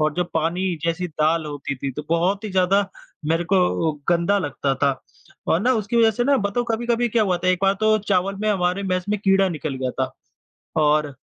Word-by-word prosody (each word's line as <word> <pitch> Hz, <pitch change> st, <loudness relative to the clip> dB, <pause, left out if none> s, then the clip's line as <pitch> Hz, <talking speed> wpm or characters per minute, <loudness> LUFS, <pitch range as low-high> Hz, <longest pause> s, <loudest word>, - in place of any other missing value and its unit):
और 155 Hz, 0 st, +2 dB
जो 180 Hz, -, 0 dB
पानी 165 Hz, +4 st, 0 dB, 0.2 s
जैसी 170 Hz, +2 st, -1 dB
दाल 155 Hz, +1 st, +1 dB
होती 145 Hz, -1 st, -5 dB
थी 135 Hz, +1 st, -4 dB
तो 150 Hz, -, -6 dB
बहुत 185 Hz, +5 st, +1 dB
ही 215 Hz, -, -4 dB
ज़्यादा 195 Hz, +2 st, +2 dB, 0.4 s
मेरे 165 Hz, +2 st, +1 dB
को 180 Hz, -4 st, +2 dB, 0.2 s
गंदा 175 Hz, +4 st, +2 dB
लगता 140 Hz, -4 st, -1 dB
था। 135 Hz, -1 st, 0 dB, 0.5 s
और 165 Hz, -, +3 dB
ना 250 Hz, +4 st, +3 dB
उसकी 220 Hz, +2 st, -2 dB
वज़ह 225 Hz, -1 st, +5 dB
से 240 Hz, +3 st, -1 dB
ना 280 Hz, +1 st, +4 dB
बताओ 205 Hz, +2 st, -1 dB
कभी-कभी 235 Hz, +1 st, 0 dB
क्या 225 Hz, 0 st, +2 dB
हुआ 185 Hz, -4 st, +1 dB
था, 185 Hz, +1 st, -1 dB
एक 185 Hz, -, +3 dB
बार 195 Hz, 0 st, +4 dB
तो 215 Hz, 0 st, +4 dB
चावल 195 Hz, -1 st, 0 dB
में 215 Hz, -, 0 dB
हमारे 185 Hz, 0 st, 0 dB
मेस 185 Hz, -1 st, -1 dB
में 210 Hz, 0 st, 0 dB
कीड़ा 195 Hz, -1 st, +3 dB
निकल 155 Hz, -4 st, -4 dB
गया 130 Hz, -1 st, -2 dB
था 130 Hz, 0 st, -1 dB, 0.7 s
और 150 Hz, -1 st, +2 dB
185 Hz, 215 wpm, -22 LUFS, 155-205 Hz, 0.7 s, वज़ह